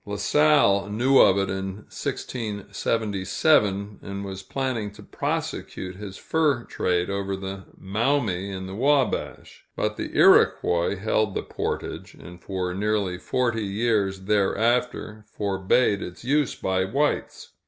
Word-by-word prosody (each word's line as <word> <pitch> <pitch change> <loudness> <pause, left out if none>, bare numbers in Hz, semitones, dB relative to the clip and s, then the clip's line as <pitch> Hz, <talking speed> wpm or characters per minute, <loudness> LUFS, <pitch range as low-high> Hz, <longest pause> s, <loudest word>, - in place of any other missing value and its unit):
La 100 -1 -5
Salle 105 -3 +3
knew 125 +6 +3
of 95 - +6
it 100 0 +1
in 95 0 -3 0.2
1677, 105 - -1
and 100 0 -6
was 95 0 -6
planning 125 -1 -2
to 100 - -14
prosecute 90 -1 -4
his 100 -1 -8
fur 150 -6 +1
trade 90 -4 -1
over 100 0 -2
the 95 0 -7
Maumee 105 -2 0
and 95 -1 -5
the 95 - -7
Wabash; 135 +2 0
but - - -1
the - - -4
Iroquois 85 +3 +4
held 105 0 0
the - - -2
portage, - - -5
and 90 0 -12
for 90 -2 -3
nearly 100 -2 -1
forty 120 0 0
years 100 -2 0
thereafter 110 +2 0
forbade 100 +2 +1
its 90 - -8
use 145 +1 +1
by 95 0 0
whites. 140 +10 -1
100 Hz, 130 wpm, -25 LUFS, 95-120 Hz, 0.2 s, of